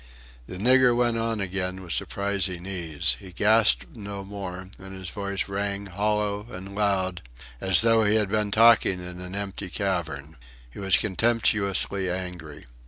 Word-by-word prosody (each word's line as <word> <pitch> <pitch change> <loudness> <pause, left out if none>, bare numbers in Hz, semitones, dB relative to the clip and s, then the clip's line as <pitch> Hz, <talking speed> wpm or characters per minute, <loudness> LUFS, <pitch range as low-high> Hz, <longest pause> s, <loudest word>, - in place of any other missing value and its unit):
The 90 - -6
nigger 125 +3 +5
went 120 -1 +2
on 115 -1 -1
again 95 -1 -3
with 85 - -3
surprising 100 -3 -1
ease. 85 -6 -1
He 95 - -11
gasped 90 - +3
no 100 -2 -7
more, 95 -2 -7
and 95 0 -10
his 95 -3 -7
voice 100 +1 -3
rang, 100 0 -2
hollow 105 +2 -1
and 95 -1 -8
loud, 95 -3 0 0.4
as 95 -1 +4
though 115 -1 +4
he 105 0 +3
had 105 -2 +2
been 105 0 0
talking 110 -3 +5
in 90 0 -8
an 90 +1 -7
empty 100 -1 -4
cavern. 80 -7 -3 0.3
He - - -11
was 95 -1 +3
contemptuously 100 -2 +1
angry. 90 -4 -6
100 Hz, 155 wpm, -26 LUFS, 90-105 Hz, 0.4 s, nigger